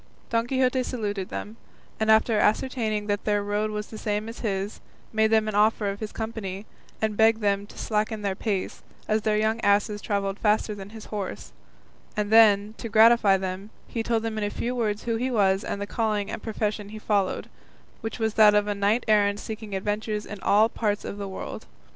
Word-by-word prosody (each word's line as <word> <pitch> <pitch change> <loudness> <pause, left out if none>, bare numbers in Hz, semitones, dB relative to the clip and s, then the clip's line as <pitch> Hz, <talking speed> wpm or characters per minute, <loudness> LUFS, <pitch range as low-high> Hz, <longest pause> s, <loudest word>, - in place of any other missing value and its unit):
Don 230 0 +1
Quixote 260 0 +2
saluted 205 -7 -3
them, 215 +2 -6 0.4
and 220 0 0
after 220 0 +4
ascertaining 215 -2 +1
that 205 -1 -1
their 205 -1 +1
road 205 +1 -1
was 210 0 -4
the 220 - -10
same 210 0 -2
as 230 - -8
his, 200 -2 -3 0.3
made 220 0 +4
them 220 0 +2
an 215 - -2
offer 210 0 +2
of 200 - -8
his 215 -1 -5
company, 220 -3 -5 0.3
and 215 -1 0
begged 220 +1 +4
them 200 -1 0
to - - -15
slacken 215 0 -1
their 200 -1 0
pace, 195 -1 -3 0.3
as 215 0 +1
their 210 0 +1
young 220 +1 +1
asses 205 +1 +2
travelled 200 -1 -2
faster 215 0 +2
than 200 -1 -9
his 220 0 -10
horse; 200 -3 -5 0.7
and 210 0 -1
then, 215 -2 +6
to 230 - -5
gratify 220 -2 +6
them, 190 +2 -5 0.2
he 230 - -3
told 225 0 0
them 220 -1 -2
in - - -2
a 205 - 0
few 240 +4 -3
words 215 -3 -1
who 230 -1 -1
he 250 +3 -1
was 195 -5 +2
and - - -4
the 200 - -3
calling 215 -2 -1
and - - -5
profession 210 -2 -3
he 215 - -8
followed, 205 -3 0 0.5
which 225 0 -4
was 220 -2 0
that 210 -1 +6
of 210 0 +3
a 210 - -1
knight 205 +4 +1
errant 205 -1 +3
seeking 215 -2 -6
adventures 210 +2 -2
in 210 - -8
all 215 +2 +4
parts 210 -3 -2
of 205 - -6
the 200 - -4
world. 190 - -7
210 Hz, 205 wpm, -26 LUFS, 205-220 Hz, 0.7 s, then